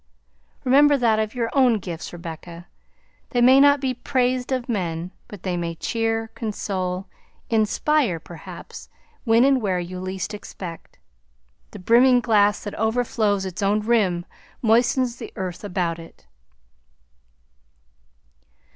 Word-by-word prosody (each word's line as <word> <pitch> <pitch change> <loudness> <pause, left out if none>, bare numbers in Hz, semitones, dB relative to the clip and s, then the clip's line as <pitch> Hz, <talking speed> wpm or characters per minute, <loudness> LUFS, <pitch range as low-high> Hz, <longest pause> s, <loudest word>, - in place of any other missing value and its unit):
Remember 285 +2 +5
that 230 -4 +2
of 215 +2 -2
your 230 -2 -1
own 255 -5 +4
gifts, 175 -4 -6
Rebecca; 170 0 -9 0.6
they 245 - 0
may 255 +3 +7
not 285 0 +6
be 260 -1 -1
praised 250 0 -1
of 255 -2 -1
men, 175 -6 -3 0.2
but 205 -4 -11
they 185 -2 -1
may 170 -1 -3
cheer, 225 +3 -2
console, 190 -4 -3 0.5
inspire, 225 - +1
perhaps, 170 +1 -11 0.4
when 230 +1 +5
and 270 -1 +4
where 190 -4 0
you 180 +1 -6
least 185 +2 -4
expect. 180 -4 -9 0.7
The - - -10
brimming 245 +6 +5
glass 210 -3 +2
that 205 - -5
overflows 220 -3 0
its 190 +2 -5
own 205 +2 +2
rim 205 -6 +1 0.4
moistens 240 +2 +2
the - - -8
earth 185 0 -5
about 180 -4 -2
it." 165 - -14
215 Hz, 130 wpm, -23 LUFS, 180-245 Hz, 0.7 s, may